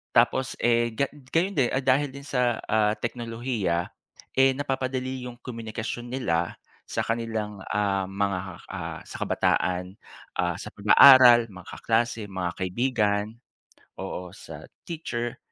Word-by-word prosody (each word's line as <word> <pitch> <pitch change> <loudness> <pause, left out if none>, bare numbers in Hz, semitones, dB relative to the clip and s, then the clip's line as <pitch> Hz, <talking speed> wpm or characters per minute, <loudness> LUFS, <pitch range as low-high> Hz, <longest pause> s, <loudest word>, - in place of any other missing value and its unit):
Tapos 130 +2 +3
eh, 120 -1 +2
ga 140 +4 0
gayon 165 +6 -2
din, 130 - +4
ah, 135 - +1
dahil 135 +2 +3
din 140 - -8
sa, 125 -4 0
ah, 105 -1 +3
teknolohiya 115 -8 -2 0.5
eh 135 0 +5
napapadali 130 -2 -3
yung 125 - -7
komunikasyon 115 0 -5
nila 85 -10 -1 0.3
sa - - -2
kanilang 110 -3 -3
ah, 100 -2 0
mga 100 0 -1 0.3
ah, - - -5
sa - - -9
kabataan, 90 +2 0 0.4
ah 90 -1 +1
sa - - -8
pag-aaral, 120 +2 +8
mga 90 -2 -12
kaklase, 115 -2 -1
mga 90 -2 -2
kaibigan, 105 +1 0 0.8
oo, 90 -1 -6
sa - - -10 0.2
teacher. 120 -8 -4
115 Hz, 130 wpm, -26 LUFS, 100-130 Hz, 0.8 s, pag-aaral